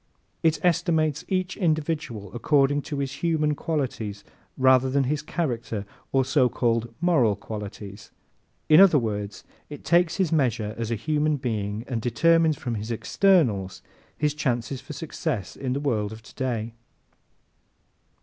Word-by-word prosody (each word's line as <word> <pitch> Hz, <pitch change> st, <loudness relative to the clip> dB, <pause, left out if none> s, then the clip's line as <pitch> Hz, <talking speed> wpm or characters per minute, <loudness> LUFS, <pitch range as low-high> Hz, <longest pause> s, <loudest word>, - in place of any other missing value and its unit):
It 160 Hz, -1 st, +3 dB
estimates 160 Hz, -3 st, +1 dB
each 185 Hz, -1 st, -1 dB
individual 155 Hz, -, -2 dB
according 145 Hz, +3 st, +2 dB
to 145 Hz, -, -3 dB
his 140 Hz, -1 st, -2 dB
"human" 155 Hz, -3 st, +1 dB
qualities 125 Hz, -10 st, -3 dB, 0.3 s
rather 130 Hz, 0 st, +4 dB
than 140 Hz, +1 st, +2 dB
his 145 Hz, +3 st, -1 dB
"character" 120 Hz, -, -3 dB, 0.3 s
or 135 Hz, -1 st, +2 dB
so 135 Hz, -2 st, +3 dB
called 115 Hz, -1 st, 0 dB
"moral" 155 Hz, -, +3 dB
qualities. 105 Hz, 0 st, -8 dB, 0.6 s
In 155 Hz, +3 st, +8 dB
other 190 Hz, -6 st, +7 dB
words, 105 Hz, -5 st, -3 dB, 0.3 s
it 145 Hz, -, -10 dB
takes 175 Hz, -1 st, +3 dB
his 185 Hz, -4 st, 0 dB
measure 120 Hz, -8 st, +1 dB
as 115 Hz, -1 st, -4 dB
a 115 Hz, -, 0 dB
human 150 Hz, +5 st, 0 dB
being 110 Hz, -3 st, -3 dB
and 120 Hz, -4 st, -2 dB
determines 165 Hz, +5 st, +3 dB
from 120 Hz, -3 st, -4 dB
his 110 Hz, 0 st, -4 dB
externals 115 Hz, -, +1 dB, 0.3 s
his 150 Hz, -1 st, +1 dB
chances 130 Hz, -4 st, -2 dB
for 140 Hz, -, -9 dB
success 145 Hz, -, -4 dB
in 130 Hz, -2 st, -3 dB
the 140 Hz, -, -1 dB
world 110 Hz, -8 st, -1 dB
of 110 Hz, 0 st, -10 dB
today. 115 Hz, -3 st, -4 dB
135 Hz, 140 wpm, -25 LUFS, 115-155 Hz, 0.6 s, In